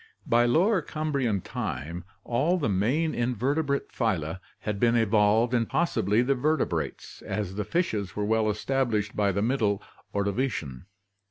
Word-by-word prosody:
— - - -38
By 120 0 +5
Lower 185 - +3
Cambrian 140 - -1
time 80 +7 -5 0.2
all 155 +10 +1
the 155 - 0
main 120 - +1
inverte 125 +6 0
brate 140 -1 -2
phyla 95 -8 -1 0.2
had 105 -2 -3
been 120 +1 +3
evolved 110 +1 +3
and 115 -2 +1
possibly 115 - +2
the 135 +2 +2
vertebrates, 155 +5 -2
as 95 -1 -3
the 105 +2 -2
fishes 110 - -1
were 105 - -1
well 110 0 +2
established 110 -1 0
by 100 -1 +2
the 100 +2 -1
Middle 110 -5 +1 0.3
Ordovician. 100 - -2
115 Hz, 150 wpm, -27 LUFS, 100-135 Hz, 0.3 s, By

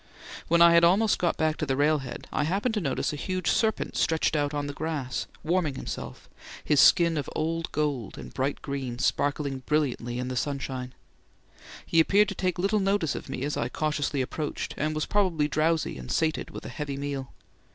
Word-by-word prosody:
When 170 +1 +5
I 170 0 +7
had 170 0 +6
almost 195 +5 +4
got 175 - +1
back 155 -1 +1
to 135 -4 -1
railhead 145 -3 0
I - - +1
happened 200 +8 0
to 210 - 0
notice 140 -1 -1
a - - -3
huge 185 +3 -1
serpent 220 -1 0
stretched 160 0 +1
out 145 -1 +1
on 145 -1 -2
the 145 - -4
grass, 145 -4 -3 0.2
warming 160 -3 0
himself, - - -6 0.4
his 150 -2 +3
skin 170 +1 +6
of 145 - -3
old 165 +1 -1
gold 145 -7 -2
and - - -9
bright 135 +2 -2
green 135 -4 -4
sparkling 140 +1 0
brilliantly 130 -5 0
in 125 0 -3
the 130 - -3
sunshine. 130 -2 -3 0.9
He 165 - +2
appeared 200 +5 +4
to - - -3
take 180 -2 -1
little 200 +4 +1
notice 195 -5 +1
of - - -7
me 135 -1 -4
as 145 +1 -1
I 120 - -1
cautiously 145 -2 -1
approached, 150 +3 -4
and 155 +1 -1
was 155 - -1
probably 180 -8 +1
drowsy 155 - 0
and 60 - -7
sated 160 -1 0
with - - -9
a - - -5
heavy 145 -3 -4
meal. 140 -2 -4
150 Hz, 195 wpm, -27 LUFS, 140-170 Hz, 0.9 s, I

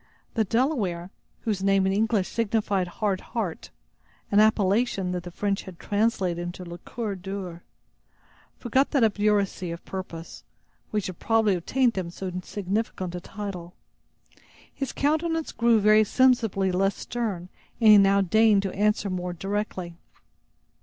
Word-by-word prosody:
The 225 - +2
Delaware, 205 - 0 0.3
whose 210 -5 -2
name 195 -1 +3
in 190 - +1
English 215 -2 +1
signified 210 -4 0
"Hard 195 +1 -2
Heart," 215 -8 -4 0.6
an 205 - +5
appellation 210 -2 +2
that 180 -1 -2
the 175 - -8
French 200 +3 -1
had 185 -3 -11
translated 200 -5 0
into 175 +1 -6
"le 170 0 -8
Coeur 220 +2 -4
dur," 185 -2 -6 1.0
forgot 260 +3 +1
that 275 -5 +2
obduracy 205 -4 +1
of 170 0 -7
purpose, 175 -3 -7 0.5
which 210 -3 -1
had 185 -2 -6
probably 225 -3 +2
obtained 235 +7 +1
him 175 -2 -4
so 185 +2 -6
significant 195 -2 -3
a 180 - -5
title. 185 -3 -7 1.0
His 275 -2 -4
countenance 320 +2 0
grew 230 -1 +3
very 215 +1 +6
sensibly 225 -5 +2
less 195 +2 +1
stern 205 -7 -4 0.3
and 225 -2 +6
he 210 - +9
now 195 0 +4
deigned 210 +1 +4
to 195 - -3
answer 210 +1 +1
more 180 -1 -3
directly. 195 -1 -3
200 Hz, 140 wpm, -26 LUFS, 185-225 Hz, 1.0 s, he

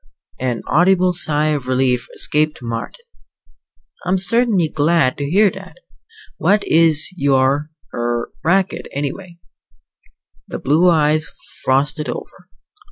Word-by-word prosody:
An 125 -3 -2
audible 180 +2 +3
sigh 155 -3 0
of 145 -4 -2
relief 130 -1 0
escaped 150 -3 -1
Marden. 115 - -6 1.0
"I'm 185 +1 0
certainly 200 -2 +2
glad 150 -3 +1
to 140 0 -3
hear 200 +3 +4
that! - - -11 0.6
What 200 +5 +2
is 160 -2 +4
your 140 -1 +1 0.2
er 120 0 -2
racket, 190 +3 0
anyway?" 170 +6 -5 1.1
The - - -6
blue 155 +7 +3
eyes 155 -1 +2 0.3
frosted 145 +3 0
over. - - -8
155 Hz, 110 wpm, -18 LUFS, 135-180 Hz, 1.1 s, hear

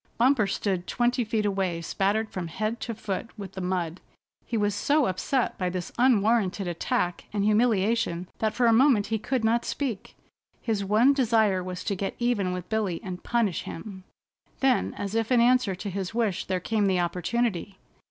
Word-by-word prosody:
Bumper 245 -3 +3
stood 190 -2 -2
twenty 245 +1 +1
feet 220 -1 -1
away 190 -4 0
spattered 200 +6 -1
from 180 -3 -4
head 215 +7 -3
to 230 - -4
foot 205 0 -4
with 195 -3 -7
the 190 - -6
mud. 180 -2 -2 0.5
He 230 - -1
was 205 -1 +1
so 285 +8 +2
upset 240 +7 -1
by 180 -1 0
this 180 -1 -4
unwarranted 215 -5 +3
attack 175 +1 -1
and 205 -1 0
humiliation 215 -4 +2
that 220 -1 0
for 245 - +2
a 230 - +5
moment 240 -4 +5
he 220 - +1
could 250 +2 -1
not 230 +1 +2
speak. 245 -9 -4 0.4
His 215 -4 -1
one 220 +8 +4
desire 220 -8 +2
was 180 0 -5
to - - -1
get 195 0 -3
even 235 -6 0
with 180 -1 -5
Billy, 210 -6 -1
and 185 -2 -6
punish 230 -7 0
him. 190 +1 -8 0.6
Then 265 -2 +2
as 200 0 -4
if 225 +1 0
in 245 - +5
answer 240 -4 +3
to 200 +3 -5
his 195 +2 -4
wish 220 -6 0
there 185 -1 -1
came 210 +2 0
the 185 -2 +2
opportunity. 190 +2 -1
210 Hz, 180 wpm, -26 LUFS, 185-235 Hz, 0.6 s, a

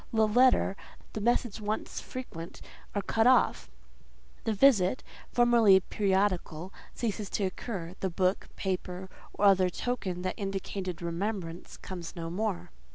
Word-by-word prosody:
The 220 -1 +3
letter, 245 -3 +4 0.4
the 215 - -3
message 240 -1 +1
once 210 +1 -3
frequent, 170 -10 -8 0.4
are 205 - 0
cut 225 +1 +2
off; 255 -1 +3 0.8
the 225 - +1
visit, 215 -2 +4 0.3
formerly 235 -5 +6
periodical, 190 -3 0 0.2
ceases 215 -3 -2
to 205 - -1
occur; 185 -2 -4
the 190 - -1
book, 185 +2 0
paper, 185 -1 -3 0.2
or 205 - +1
other 190 -2 +5
token 185 -4 -3
that 185 - -1
indicated 195 -3 -4
remembrance, 170 0 -4
comes 175 -3 -7
no 165 -1 -5
more. 200 - -2
195 Hz, 130 wpm, -30 LUFS, 180-220 Hz, 0.8 s, formerly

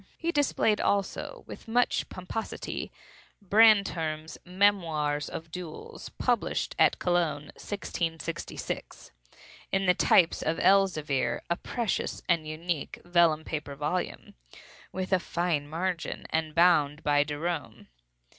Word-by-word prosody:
He 335 0 -1
displayed, 275 -8 +2
also, 200 -1 -1
with - - -11
much 245 +2 +1
pomposity, 185 +4 -5 0.5
Brantome's 195 -7 +3
"Memoirs 170 -6 +1
of 160 0 -7
Duels," 175 -3 -8
published - - 0
at - - +5
Cologne, 165 -4 0
1666, 165 -5 -5 0.6
in 195 0 +1
the 180 - +5
types 175 -1 +4
of 160 +1 0
Elzevir—a 170 -5 +2
precious 235 -5 -2
and 165 -3 +1
unique 160 0 -4
vellum 170 -3 +3
paper 150 -3 -5
volume, 150 +6 -3 0.6
with 185 +1 -3
a 185 - +5
fine 170 -4 -1
margin, 170 +2 -3
and 160 -1 -1
bound 155 -4 +4
by 145 0 +3
Derome. 150 -5 -4
170 Hz, 110 wpm, -28 LUFS, 155-190 Hz, 0.6 s, at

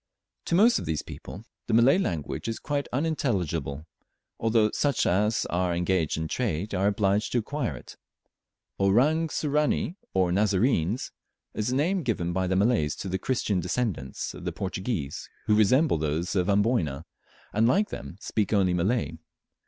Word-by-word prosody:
To - - 0
most 225 +6 +5
of - - -6
these 80 -2 -1
people 100 +5 -9 0.2
the 110 - +2
Malay 125 +9 +5
language 85 - -3
is 115 - -2
quite 145 -1 -2
unintelligible, 90 - -1 0.5
although 110 -1 +3
such 140 -4 +1
as 105 +5 +2
are 90 0 0
engaged 90 -3 0
in 80 0 -2
trade 100 -2 -2
are 95 +1 +2
obliged 100 0 +1
to - - +2
acquire 125 +2 -2
it. - - -13 0.8
"Orang 135 +12 +3
Sirani," 150 +4 0 0.2
or 90 -2 +3
Nazarenes, 100 - +1 0.4
is 105 - -2
the 125 - 0
name 175 +7 +1
given 90 - -1
by 95 0 0
the 95 - 0
Malays 95 -8 +2
to 95 - -6
the 95 +1 -1
Christian 105 -5 0
descendants 90 - -3
of - - -10
the - - -2
Portuguese, 95 - -4 0.2
who 105 - +3
resemble 110 - +4
those 80 +5 -1
of 90 +1 +1
Amboyna, 100 - +1 0.5
and, 110 +2 +3
like 200 - +2
them, 70 +5 -7
speak 105 -2 -1
only 95 -3 +3
Malay. 100 +7 0
105 Hz, 160 wpm, -27 LUFS, 90-125 Hz, 0.8 s, most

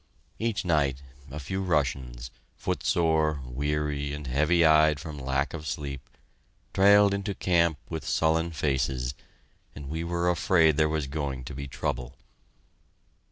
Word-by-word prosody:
Each 110 -3 -1
night, 70 -5 +1 0.3
a 70 - -7
few 95 +7 -3
Russians, 65 -8 -1 0.2
footsore, 80 -3 +1
weary, 70 +2 -2
and 75 0 -6
heavy 75 +6 +3
eyed 80 -1 +5
from 75 -2 -7
lack 70 +2 -1
of 80 -2 -6
sleep, 70 -2 -4 0.7
trailed 100 +1 +6
into 100 0 -2
camp 85 -3 +2
with 80 - -5
sullen 80 +1 +1
faces, 65 -5 -1 0.6
and 70 -1 -8
we 80 +2 -3
were 85 +1 0
afraid 80 -3 +3
there 75 0 +3
was 80 -2 -1
going 70 -2 -4
to - - -8
be 70 +2 -6
trouble. 60 -2 -4
75 Hz, 135 wpm, -27 LUFS, 70-85 Hz, 0.7 s, trailed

